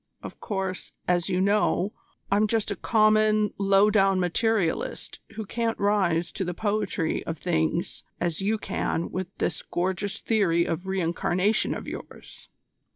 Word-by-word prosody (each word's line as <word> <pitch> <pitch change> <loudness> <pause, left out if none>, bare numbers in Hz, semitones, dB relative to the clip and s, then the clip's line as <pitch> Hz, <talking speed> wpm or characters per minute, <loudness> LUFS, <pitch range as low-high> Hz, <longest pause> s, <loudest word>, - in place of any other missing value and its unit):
Of - - -9
course, 190 -3 -4
as 175 0 +1
you 180 -1 +1
know, 200 0 +2 0.4
I'm 210 +2 +4
just 220 -1 0
a - - -1
common, 215 -1 +3
low 195 +1 +4
down 195 -2 +3
materialist 185 0 0
who 220 0 -5
can't 230 +2 -1
rise 190 -5 +1
to 195 - -3
the 175 -1 -3
poetry 205 -6 -1
of 165 - -3
things 165 +1 -1 0.2
as 175 0 -1
you 215 +3 +1
can 170 -5 -2
with 185 0 -3
this - - -1
gorgeous 190 +3 -2
theory 175 -7 +2
of 170 +3 -3
re 190 0 -1
incarnation 180 +5 +1
of - - -7
yours. - - -9
195 Hz, 150 wpm, -26 LUFS, 175-215 Hz, 0.4 s, I'm